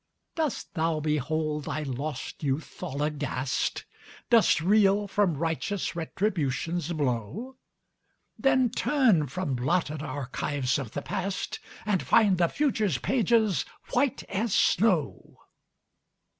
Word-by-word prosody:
Dost 315 -5 -2
thou 160 -2 0
behold 150 0 -1
thy 155 - -3
lost 140 +1 -5
youth 145 +1 -3
all 140 +3 -3
aghast? 145 -3 -2 0.5
Dost 230 -8 +5
reel 200 +3 +3
from 195 -6 +1
righteous 165 +5 -2
Retribution's 170 -2 -1
blow? 145 - -2 0.8
Then 260 -3 +3
turn 230 - +3
from 150 +1 -3
blotted 150 +4 0
archives 140 -1 -2
of 125 -6 -6
the 145 - -4
past, 195 0 -3 0.3
And 205 -4 +1
find 200 -5 +4
the 170 - +4
future's 220 - +1
pages 220 - +2 0.3
white 255 0 +1
as 210 +1 -1
snow. 180 -7 +1
165 Hz, 110 wpm, -27 LUFS, 145-210 Hz, 0.8 s, Dost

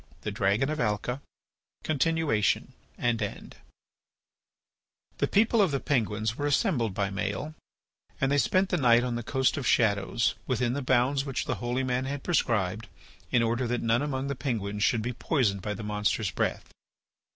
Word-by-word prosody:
THE 105 - -3
DRAGON 105 +6 +1
OF 155 - -3
ALCA 120 +4 -1 0.6
(Continuation 155 -7 +1 0.2
and 120 -2 0
End) - - -5 1.6
The - - +2
people 220 +2 +3
of 195 - +4
the 140 -2 -1
Penguins 110 -5 0
were 145 - -2
assembled 125 - +1
by 100 -1 -1
Maël 100 +9 -3 0.7
and 135 0 +1
they 145 - +3
spent 185 +6 +2
the 180 - +1
night 120 -4 +5
on 125 -1 -1
the 120 - -2
Coast 130 +4 +1
of 140 - -2
Shadows 105 +1 +2
within 125 -1 0
the 145 - -2
bounds 130 +2 +2
which 135 -2 -3
the - - -1
holy 120 +2 -1
man 125 0 -1
had 140 +1 -4
prescribed 110 - 0 0.4
in 120 -2 +3
order 120 +2 0
that 120 0 -1
none 115 +2 +2
among 135 -2 -2
the 140 - -2
Penguins 110 -6 -2
should 115 -3 +2
be 125 +2 -2
poisoned 115 - 0
by 105 +2 -3
the 105 - -7
monster's 105 -1 0
breath. - - -2
120 Hz, 170 wpm, -28 LUFS, 110-140 Hz, 1.6 s, night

